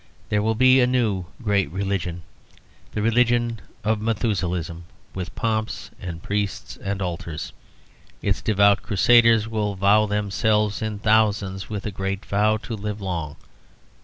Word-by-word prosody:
There 105 - +2
will 110 +1 +1
be 130 +2 +6
a 125 - +4
new 110 -8 0 0.2
great 100 -6 +1
Religion, 90 -1 -3 0.7
the 105 - -2
Religion 120 -1 +2 0.2
of 110 0 0
Methuselahism: 90 -7 -2 0.3
with 90 -2 -6
pomps 110 -1 -2
and 85 -2 -6
priests 100 0 -3
and 100 0 -3
altars. 85 -3 -5 0.7
Its 100 -1 -1
devout 100 -2 +4
crusaders 115 +1 +4
will 105 -2 -2
vow 100 +3 +4
themselves 105 0 0
in 110 -1 -3
thousands 105 -2 +1
with 105 -2 -5
a 105 - -2
great 95 +1 -4
vow 105 +2 +2
to 115 +1 -7
live 105 -1 -4
long. 85 -7 -4
105 Hz, 135 wpm, -23 LUFS, 95-110 Hz, 0.7 s, be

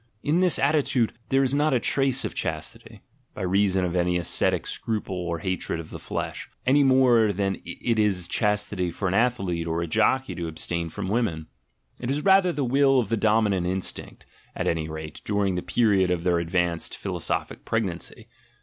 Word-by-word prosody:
In 155 +4 +2
this 180 -2 +3
attitude 140 -5 +2 0.2
there 135 +1 +3
is 130 0 +1
not 145 -1 +2
a - - +3
trace 135 +1 +1
of - - -4
chastity, 80 -1 -6 0.3
by - - -5
reason 95 0 +2
of 90 0 -3
any 90 0 +1
ascetic 85 - +1
scruple 105 -4 -3
or 85 -2 -3
hatred 90 0 -3
of 80 - -9
the - - -7
flesh, - - -5 0.2
any 140 +3 +4
more 125 -5 +4
than 95 0 -2
it 115 -2 -2
is 95 -4 +1
chastity 105 -3 0
for 95 +4 -3
an 90 - 0
athlete 95 -7 0
or 80 0 -1
a 85 - -1
jockey 110 +9 +1
to 85 -1 -4
abstain 85 +1 -3
from 85 - -5
women; 100 -7 -1 0.5
it 120 - -4
is 145 +2 -1
rather 190 -2 +5
the 150 -4 -2
will 135 +1 +4
of 115 -5 -2
the 115 - +2
dominant 105 -4 +2
instinct, 95 0 -4 0.3
at - - -2
any 80 -1 -1
rate, 80 -1 -7
during 100 -2 0
the 90 - -2
period 100 -6 +2
of 90 -2 -1
their 90 -1 +2
advanced 85 0 -1
philosophic - - -3
pregnancy. 95 -7 -3
100 Hz, 185 wpm, -25 LUFS, 90-125 Hz, 0.5 s, rather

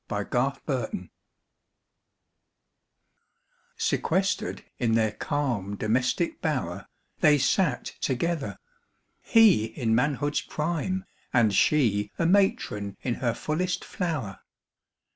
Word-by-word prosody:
DOMESTIC 120 +6 -1
BLISS 130 -4 -1
IV 90 - -5 2.7
Sequestered - - 0
in 115 -2 +2
their 110 -1 +2
calm 115 -7 -2
domestic 125 - 0
bower, 100 - -2 0.3
They 150 -1 +5
sat 140 +1 +1
together. 145 +3 -1 0.6
He 220 - +5
in 115 0 -1
manhood's 145 +4 +1
prime 175 +5 -2 0.3
And 115 -5 +3
she 105 -5 +3
a 165 - +1
matron 165 - +1
in 125 - 0
her 120 -3 +1
fullest 180 +4 -2
flower. 150 - -3
130 Hz, 95 wpm, -27 LUFS, 110-155 Hz, 2.7 s, They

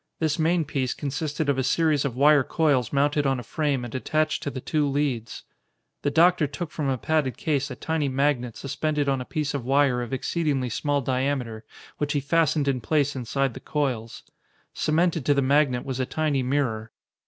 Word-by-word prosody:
This 160 -1 0
main 165 +1 +2
piece 135 -3 -2
consisted 150 +1 -3
of 140 -2 +1
a - - +1
series 155 0 +2
of 130 -4 -2
wire 145 +1 +5
coils 140 -6 +1
mounted 145 +1 +2
on 135 -2 +1
a - - -7
frame 140 0 -1
and 120 - -8
attached 155 +4 0
to - - -3
the 135 - -6
two 150 +2 0
leads. 135 -5 -2 0.6
The 145 - +1
doctor 165 +1 +4
took 150 +3 -6
from 145 -4 -2
a 130 - 0
padded 150 -1 0
case 145 -2 -1
a 130 - -6
tiny 155 0 -1
magnet 130 -3 0
suspended 145 +1 -2
on 135 -2 +1
a - - -6
piece 150 +1 -2
of 140 -4 -3
wire 135 -1 +2
of 120 - -5
exceedingly 135 -1 -1
small 145 +4 0
diameter 130 -4 -2 0.3
which 145 -1 -1
he 145 - +1
fastened 150 0 +1
in 130 -3 0
place 145 +4 +1
inside 130 +1 -1
the - - -8
coils. 125 -7 -3 0.5
Cemented 165 0 +1
to 145 - +4
the 140 - +3
magnet 135 -2 +2
was 130 -1 -4
a 130 - -1
tiny 150 -3 0
mirror. 125 -5 -1
140 Hz, 195 wpm, -25 LUFS, 130-150 Hz, 0.6 s, wire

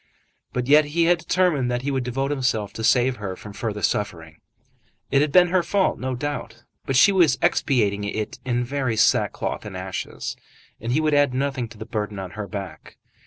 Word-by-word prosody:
But 125 -1 -2
yet 150 +3 +6
he 160 +3 +1
had 175 +1 +3
determined 170 -7 +1
that 120 +1 -2
he 140 - -1
would 135 -2 -1
devote 135 +3 -2
himself 125 -7 -1
to 115 - -6
save 125 +2 +3
her 95 -3 -5
from 105 +2 -11
further 105 -1 -4
suffering. 80 -6 -2 0.7
It 140 0 +4
had 150 -1 +1
been 180 +2 +6
her 185 0 +3
fault, 190 +3 0
no 130 0 -2
doubt. 145 +3 -5 0.2
But 135 - 0
she 170 +10 +7
was 170 -9 +4
expiating 105 -6 +1
it 105 +1 -4
in 125 -1 0
very 130 -2 -1
sackcloth - - +1
and 100 -3 -7
ashes, 95 0 -5 0.4
and 115 +2 -4
he 140 - +2
would 155 -1 +1
add 145 -3 +3
nothing 130 -2 -1
to 115 0 -14
the - - -7
burden 105 -3 -4
on 95 -2 -6
her 105 0 -6
back. 95 -7 -8
125 Hz, 200 wpm, -23 LUFS, 105-145 Hz, 0.7 s, she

